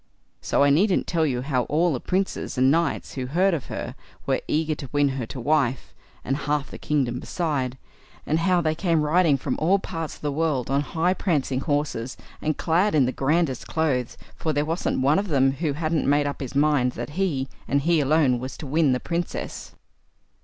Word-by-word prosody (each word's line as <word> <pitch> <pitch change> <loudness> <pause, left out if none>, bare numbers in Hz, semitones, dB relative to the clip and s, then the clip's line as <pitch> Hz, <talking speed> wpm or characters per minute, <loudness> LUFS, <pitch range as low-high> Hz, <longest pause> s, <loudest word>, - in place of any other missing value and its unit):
So - - +2
I 140 - +5
needn't 185 +6 +3
tell 160 -2 +1
you 125 -3 -1
how 130 -3 0
all 165 +3 +2
the 130 - -2
princes 190 -3 -2
and 130 +1 +4
knights 165 -1 0
who 130 -2 -4
heard 180 +7 +2
of 150 -6 -3
her - - -5 0.3
were - - 0
eager 155 +1 +1
to 140 -3 -7
win 145 -1 +3
her 130 -4 -4
to 130 - -7
wife, 125 - 0 0.3
and 135 +2 0
half 145 -1 -2
the - - -8
kingdom 130 -5 0
beside; 140 -6 -2 0.5
and 155 - +1
how 180 +1 +3
they 155 -2 +1
came 165 -2 +1
riding 155 -1 +3
from 130 0 -3
all 180 +5 +3
parts 165 -5 -5
of - - -18
the 145 - -1
world 140 -4 -1
on 140 +1 +2
high 165 +4 0
prancing 145 -9 0
horses, 145 -5 -2 0.2
and 155 0 -1
clad 180 +4 +2
in 140 -4 +5
the 125 - 0
grandest 140 -1 0
clothes, 140 -7 -1 0.2
for 155 - -2
there 145 +1 +1
wasn't 165 -3 -1
one 145 +7 +4
of 205 - -2
them 135 -5 +3
who 145 +2 -2
hadn't 155 -1 0
made 145 0 +3
up 145 0 -4
his 135 0 -6
mind 140 -4 +3
that 120 +4 -6
he, 150 -6 -1 0.2
and 140 +1 +1
he 165 +2 +3
alone, 140 -3 +3
was 130 +2 -6
to - - -7
win 145 -1 +2
the 125 - 0
Princess. 170 +4 -4
145 Hz, 205 wpm, -24 LUFS, 135-165 Hz, 0.5 s, I